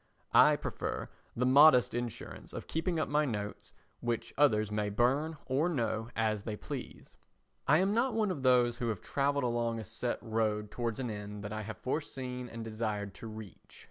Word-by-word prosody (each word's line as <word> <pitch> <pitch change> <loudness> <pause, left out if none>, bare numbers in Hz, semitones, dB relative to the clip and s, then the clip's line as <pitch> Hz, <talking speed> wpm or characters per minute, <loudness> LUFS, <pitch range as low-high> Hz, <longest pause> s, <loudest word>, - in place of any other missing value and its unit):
I - - +7
prefer - - -4 0.3
the 125 - +1
modest 130 -1 +7
insurance 120 -1 -5
of - - -6
keeping 165 +1 -1
up - - 0
my 150 +1 +2
notes 105 -6 -4 0.3
which 120 -1 -2
others 110 -7 +3
may 105 -1 0
burn 135 +9 +1
or 140 +6 +1
no 115 -6 -1
as 110 -2 +1
they 105 0 -4
please. - - -8 0.5
I 150 - +6
am 190 +4 +2
not 235 +1 +1
one 215 -3 +2
of 155 -7 -4
those 125 -2 +4
who 120 -2 -2
have 110 -5 -2
travelled 140 0 0
along 120 -1 0
a 110 - -4
set 120 +4 -3
road 110 -2 -1
towards 120 -2 -2
an 125 -3 -2
end 105 0 -6
that 105 +1 -5
I 110 - -3
have 110 +1 -6
foreseen 125 -3 -4
and 115 0 -6
desired 110 -3 -3
to 115 - -9
reach. 110 -4 -11
120 Hz, 185 wpm, -32 LUFS, 110-140 Hz, 0.5 s, I